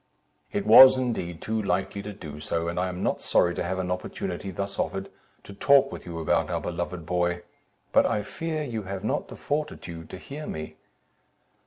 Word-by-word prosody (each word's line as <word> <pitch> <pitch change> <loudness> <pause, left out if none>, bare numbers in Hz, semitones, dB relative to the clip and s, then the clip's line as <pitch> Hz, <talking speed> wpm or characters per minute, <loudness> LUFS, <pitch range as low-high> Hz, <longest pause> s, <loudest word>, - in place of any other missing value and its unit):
"It 100 - -2
was 130 +4 +10
indeed 110 -10 -2
too 110 0 -1
likely 95 0 -1
to 105 +1 -6
do 80 -7 -9
so, 85 +2 -2
and 85 +1 -2
I 90 +1 0
am 90 0 -5
not - - 0
sorry 85 - +3
to - - -3
have 90 +2 -2
an 90 -1 -2
opportunity 90 +1 -4
thus 100 +1 -4
offered, 95 0 -2 0.3
to 100 - -10
talk 135 +5 +5
with - - -8
you 85 -1 -5
about 80 - +1
our - - 0
beloved 85 -1 -4
boy; 85 0 0 0.5
but - - +6
I 105 - 0
fear 160 +6 -3
you 115 -6 -3
have 95 0 -6
not 135 +7 -1
the - - -9
fortitude 145 - -4
to - - -7
hear 145 +10 -8
me." 80 0 -6
95 Hz, 195 wpm, -27 LUFS, 85-110 Hz, 0.5 s, was